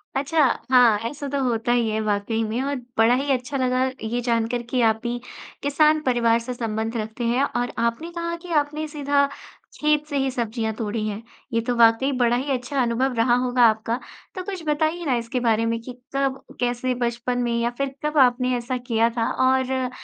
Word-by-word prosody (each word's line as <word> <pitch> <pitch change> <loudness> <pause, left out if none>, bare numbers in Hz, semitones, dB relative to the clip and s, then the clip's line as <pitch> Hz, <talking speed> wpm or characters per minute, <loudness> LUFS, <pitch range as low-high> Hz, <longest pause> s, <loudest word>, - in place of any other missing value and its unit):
अच्छा। 290 +4 0 0.3
हाँ, 245 -4 +6
ऐसा 290 -1 -6
तो 280 0 -1
होता 235 -1 0
ही 235 -2 +2
है 215 0 -1
वाक़ई 215 +2 -1
में। 220 +3 -2
और 280 +1 -1 0.2
बड़ा 225 +2 +5
ही 275 +2 -1
अच्छा 260 +2 -1
लगा 255 0 +1 0.2
ये 240 +2 -2
जानकर 235 0 0
कि 250 -1 +1
आप 220 -1 +3
भी 240 0 -2 0.5
किसान 305 +2 +3
परिवार 235 -2 +3
से 250 +2 -5
संबंध 225 -1 -3
रखते 220 +2 -4
हैं 250 +4 +2
और 245 -3 -1
आपने 235 +9 -1
कहा 340 0 -3
कि 350 - -8
आपने 300 +2 -5
सीधा 285 -1 +1 0.5
खेत 300 0 +2
से 285 - -2
ही 270 0 +1
सब्ज़ियाँ 230 -2 -2
तोड़ी 215 0 -3
हैं। 210 +1 -4 0.3
ये 230 - +2
तो 245 - +1
वाक़ई 235 +3 +4
बड़ा 240 -1 +3
ही 270 +3 -2
अच्छा 260 +1 -1
अनुभव 250 +2 +1
रहा 235 +1 +3
होगा 250 0 +2
आपका। 225 +3 -2 0.4
तो 370 - -4
कुछ 380 -4 -6
बताइए 315 +3 0
ना 265 -4 +2
इसके 235 +2 -2
बारे 230 -2 +2
में 230 0 0
कि 250 +1 -8 0.2
कब, 270 -1 0 0.2
कैसे, 245 +1 0
बचपन 240 +1 -2
में 240 - -1
या 235 - +1
फिर 275 -1 -2
कब 300 0 -1
आपने 250 -1 +4
ऐसा 245 +2 -3
किया 230 -2 +1
था? 230 -1 -1
और 260 0 +1
245 Hz, 200 wpm, -23 LUFS, 230-275 Hz, 0.5 s, हाँ